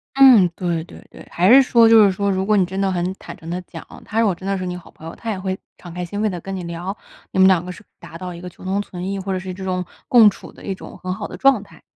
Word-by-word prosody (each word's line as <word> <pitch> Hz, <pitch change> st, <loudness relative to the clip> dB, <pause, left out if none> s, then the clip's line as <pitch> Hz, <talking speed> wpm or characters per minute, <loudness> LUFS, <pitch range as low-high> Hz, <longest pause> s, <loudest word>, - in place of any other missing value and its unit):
嗯， 250 Hz, -10 st, +7 dB
对 170 Hz, -3 st, -2 dB
对 -, -, -14 dB
对， -, -, -13 dB
还 180 Hz, +4 st, +2 dB
是 275 Hz, -, +9 dB
说 235 Hz, -3 st, +5 dB
就 225 Hz, -1 st, +7 dB
是 200 Hz, -, +4 dB
说 200 Hz, +2 st, -1 dB
如 190 Hz, 0 st, -1 dB
果 210 Hz, +1 st, +3 dB
你 190 Hz, -, +3 dB
真 190 Hz, +2 st, -5 dB
的 195 Hz, -1 st, +1 dB
很 180 Hz, 0 st, -1 dB
坦 -, -, -10 dB
诚 165 Hz, -, -10 dB
地 180 Hz, +1 st, -3 dB
讲， 165 Hz, -2 st, -11 dB, 0.2 s
他 225 Hz, -, -2 dB
如 230 Hz, -, +4 dB
果 195 Hz, -5 st, +1 dB
真 190 Hz, -, -9 dB
的 195 Hz, -, 0 dB
是 185 Hz, -, -4 dB
你 180 Hz, 0 st, -4 dB
好 180 Hz, -, -12 dB
朋 160 Hz, -, -12 dB
友， 165 Hz, -, -8 dB
他 230 Hz, -, -7 dB
也 195 Hz, -, -4 dB
会 190 Hz, 0 st, -3 dB, 0.2 s
敞 175 Hz, -2 st, -11 dB
开 180 Hz, +1 st, -4 dB
心 190 Hz, +4 st, -5 dB
扉 215 Hz, -, +2 dB
地 180 Hz, -3 st, -5 dB
跟 195 Hz, +2 st, -6 dB
你 185 Hz, -, -5 dB
聊， 170 Hz, +3 st, -5 dB, 0.4 s
你 -, -, -2 dB
们 190 Hz, -, +7 dB
两 180 Hz, -3 st, +4 dB
个 180 Hz, -, -6 dB
是 195 Hz, -, -12 dB, 0.2 s
达 165 Hz, -, -11 dB
到 180 Hz, 0 st, -6 dB
一 170 Hz, -, -10 dB
个 180 Hz, -, -7 dB
求 -, -, -17 dB
同 190 Hz, +2 st, -1 dB
存 180 Hz, -2 st, -7 dB
异， 200 Hz, 0 st, -3 dB
或 195 Hz, +1 st, -4 dB
者 185 Hz, -, -1 dB
是 185 Hz, 0 st, -6 dB
这 190 Hz, +1 st, -8 dB
种， 185 Hz, -1 st, -2 dB, 0.2 s
共 230 Hz, -4 st, +7 dB
处 -, -, -11 dB
的 -, -, -15 dB
一 195 Hz, -, -2 dB
种 -, -, -11 dB
很 185 Hz, 0 st, -4 dB
好 205 Hz, +2 st, -5 dB
的 -, -, -9 dB
状 270 Hz, -6 st, +3 dB
态。 195 Hz, -, -18 dB
190 Hz, 345 characters per minute, -20 LUFS, 180-205 Hz, 0.4 s, 是